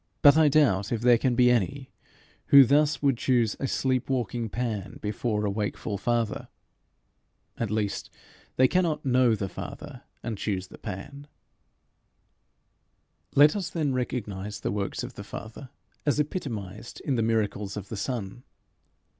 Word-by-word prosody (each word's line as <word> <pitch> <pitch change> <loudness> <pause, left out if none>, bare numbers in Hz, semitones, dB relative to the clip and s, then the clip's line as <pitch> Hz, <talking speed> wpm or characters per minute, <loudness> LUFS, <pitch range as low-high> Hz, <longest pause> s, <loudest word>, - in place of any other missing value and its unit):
But 145 0 +9
I 160 -2 +5
doubt 115 -9 +3
if 115 -2 -1
there 120 -1 +5
can 125 -1 +1
be 125 0 +5
any 130 +4 -1 0.6
who 140 -1 +9
thus 145 +2 +2
would 135 -4 +3
choose 120 -5 +2
a 135 - -1
sleep 130 -1 0
walking 120 -3 -1
Pan 105 -5 -3
before 105 0 -2
a 100 - 0
wakeful 105 0 -3
Father. 120 -3 -1 1.1
At 115 - -1
least, 105 -1 -2 0.5
they 130 - +5
cannot 165 -4 0
know 125 -3 +4
the 100 -2 -3
Father 90 - -8 0.2
and 110 -4 -4
choose 95 -3 -2
the - - -13
Pan. 135 +8 -8 2.1
Let 150 +4 +7
us 195 -4 -2
then 150 -5 -1
recognize 105 -5 -4
the - - -1
works 100 +3 -3
of 125 +1 -7
the 100 - -8
Father 110 +5 -9 0.3
as 145 0 +1
epitomized 115 - -4
in 140 - -1
the 120 - +1
miracles 105 -3 -1
of 100 -1 -7
the - - -4
Son. 115 -1 -4
120 Hz, 150 wpm, -27 LUFS, 105-135 Hz, 2.1 s, But